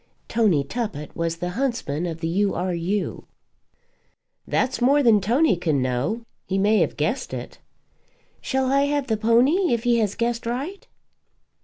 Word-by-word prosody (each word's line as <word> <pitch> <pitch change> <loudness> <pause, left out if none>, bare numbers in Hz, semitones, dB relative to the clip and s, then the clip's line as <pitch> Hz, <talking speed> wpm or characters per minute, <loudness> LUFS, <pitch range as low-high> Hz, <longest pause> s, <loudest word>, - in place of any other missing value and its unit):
Tony 210 -11 +2
Tuppett 180 - -5
was 165 0 -2
the 175 +1 -3
huntsman 210 - -2
of 165 -1 -6
the 165 - -1
U. 195 +4 +1
R. 180 +1 -1
U. 185 +4 -2 1.2
"That's 260 -1 0
more 280 +4 +4
than 220 -4 +5
Tony 245 - +3
can 160 -5 0
know. 130 - -1 0.3
He 190 - -1
may 210 +2 +3
have - - 0
guessed - - -1
it." - - -8 0.8
"Shall 265 -1 0
I 275 +1 +3
have 285 -1 0
the 225 - 0
pony 245 - +3
if 230 - -5
he 240 -1 +3
has 210 -3 0
guessed 235 0 -1
right?" 310 - -4
220 Hz, 160 wpm, -23 LUFS, 175-255 Hz, 1.2 s, than